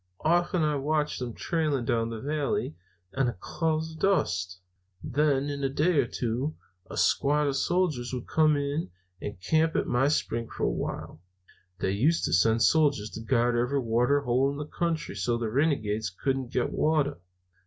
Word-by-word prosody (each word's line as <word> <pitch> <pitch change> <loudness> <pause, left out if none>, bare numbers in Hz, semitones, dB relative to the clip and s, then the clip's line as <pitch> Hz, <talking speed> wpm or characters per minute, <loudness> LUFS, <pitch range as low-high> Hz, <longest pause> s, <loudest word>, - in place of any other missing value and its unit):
Often 175 +1 +2
I've 150 -2 0
watched 150 +1 0
them 120 -3 -5
trailing 150 -7 -1
down 115 0 0
the 115 -1 -5
valley 150 - -2 0.4
in 135 -1 +2
a 120 - -1
cloud 160 - -1
of 160 0 -9
dust. 95 - 0 0.4
Then, 140 0 +1
in 140 0 -4
a 135 - +1
day 155 +4 +2
or - - +2
two, 125 +6 -2 0.3
a - - -7
squad 150 +2 +2
of 140 -1 0
soldiers 155 -6 0
would 125 -2 -4
come 155 -1 +3
up 145 +2 -2 0.3
and 105 -3 -6
camp 160 +7 +2
at - - +1
my 125 +3 +2
spring 115 -6 -1
for - - -6
a - - +2
while. 80 - -5 0.6
They 95 - +1
used 140 +12 +2
to 75 - -1
send 110 +6 +4
soldiers 145 -9 +3
to 115 - -7
guard 120 +1 +2
every 125 +4 +1
water 125 +4 +2
hole 130 +1 +2
in 140 - -4
the 150 - -4
country 165 0 -2
so 105 +4 -1
the 115 -2 -3
renegades 110 - 0
couldn't 130 +7 -2
get 125 - 0
water. 150 - +1
140 Hz, 180 wpm, -28 LUFS, 115-155 Hz, 0.6 s, send